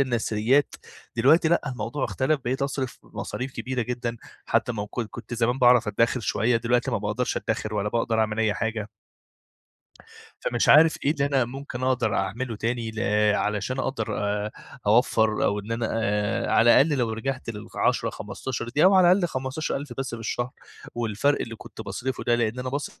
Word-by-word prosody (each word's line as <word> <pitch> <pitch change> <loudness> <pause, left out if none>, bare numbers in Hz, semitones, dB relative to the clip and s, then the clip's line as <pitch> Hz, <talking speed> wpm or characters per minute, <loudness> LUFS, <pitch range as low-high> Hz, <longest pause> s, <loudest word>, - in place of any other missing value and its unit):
النثريات، 120 +1 +1 0.4
دلوقتي 155 +8 +5
لأ، 170 - +3
الموضوع 125 +3 -3
اختلف، 140 +2 0
بقيت 130 +3 -1
أصرف 135 -2 -3
مصاريف 130 +2 -6
كبيرة 130 -1 -3
جدًا، 120 0 -3 0.3
حتى - - +1
ما 105 -3 -3
وك 105 +4 -5
كنت 120 +1 -6
زمان 120 +2 +1
باعرف 125 -3 +5
أدّخر 115 +4 +1
شوية، 115 +2 +1
دلوقتي 120 +1 +1
ما - - 0
باقدرش 105 +5 -2
أدّخر 105 0 -2
ولا 105 0 0
باقدر 115 0 0
أعمل 110 0 0
أي 110 -2 +2
حاجة. 110 +1 -3 1.5
فمش 120 -1 0
عارف 160 +2 +7
إيه 140 - +4
اللي 140 -3 0
أنا 135 -3 +2
ممكن 130 0 -7
أقدر 125 -5 +1
أعمله 115 +5 -2
تاني 115 +1 -2
ل 110 - -6 0.4
علشان 105 +5 -1
أقدر 130 -5 -2
آآ، 105 +1 -1 0.4
أوفّر، 110 -1 +3
أو 100 - +1
إن 105 +2 -7
أنا 115 0 -1
آآ، 105 -2 0
على 120 +3 +6
الأقل 145 0 +1
لو 115 -2 0
رجعت 130 +4 -4
لل10 105 -2 -1
15 120 -2 -5
دي، 145 +6 +2
أو 190 +2 +7
على 180 -2 +6
الأقل 185 -1 +3
15 130 +1 -3
ألف 140 -2 -5
بس 135 -1 -3
في - - -9
الشهر، 120 +2 -2 0.4
والفرق 120 +5 +1
اللي 115 - -5
كنت 110 - -10
باصرفه 120 +6 -4
ده 120 - +3
لأن 120 +1 -1
أنا 130 0 -3
باص 140 +2 -5
120 Hz, 175 wpm, -25 LUFS, 110-130 Hz, 1.5 s, عارف